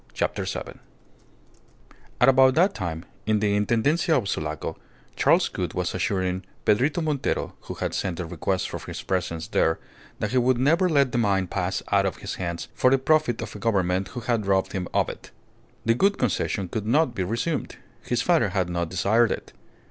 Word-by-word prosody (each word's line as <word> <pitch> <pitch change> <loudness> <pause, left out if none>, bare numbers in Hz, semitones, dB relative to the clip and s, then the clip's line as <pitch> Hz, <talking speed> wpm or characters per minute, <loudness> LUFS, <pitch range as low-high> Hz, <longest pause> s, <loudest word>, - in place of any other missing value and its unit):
CHAPTER - - -1
SEVEN - - -5 1.4
At 125 - +5
about 130 0 +6
that 185 +4 +4
time, 85 -3 -4 0.2
in 110 -1 +3
the 100 -1 +1
Intendencia 130 - +2
of 110 -6 -1
Sulaco, 75 -4 -3 0.4
Charles - - +4
Gould - - -4
was - - -1
assuring 95 -1 -1 0.2
Pedrito 135 +10 +2
Montero, 150 -4 -1
who - - -6
had - - -3
sent 90 -4 -2
a 90 - -2
request 90 +3 -2
for - - -5
his - - -7
presence 85 -2 -2
there, 80 -7 +2 0.4
that 105 - -2
he 130 - +3
would 125 0 +3
never 165 +8 +3
let 140 -5 +3
the 120 - 0
mine 100 -4 +2
pass 90 +1 -2
out 100 -1 +4
of 95 - -4
his 100 - -5
hands 85 -1 -3
for 130 - +3
the 135 - +4
profit 135 -3 +2
of - - -8
a - - -7
Government 95 -4 +1
who 120 +1 -7
had 115 -4 -1
robbed 95 -1 +2
him 90 -2 -2
of - - +2
it. - - -9 0.6
The 115 - +4
Gould 195 - +2
Concession 100 -4 -1
could 105 +4 -4
not 140 +2 +3
be 95 - -2
resumed. 115 - -2 0.3
His 120 0 -1
father 165 - +3
had 95 -2 -1
not 85 -1 -1
desired 105 +5 +2
it. - - -5
105 Hz, 190 wpm, -25 LUFS, 95-130 Hz, 1.4 s, about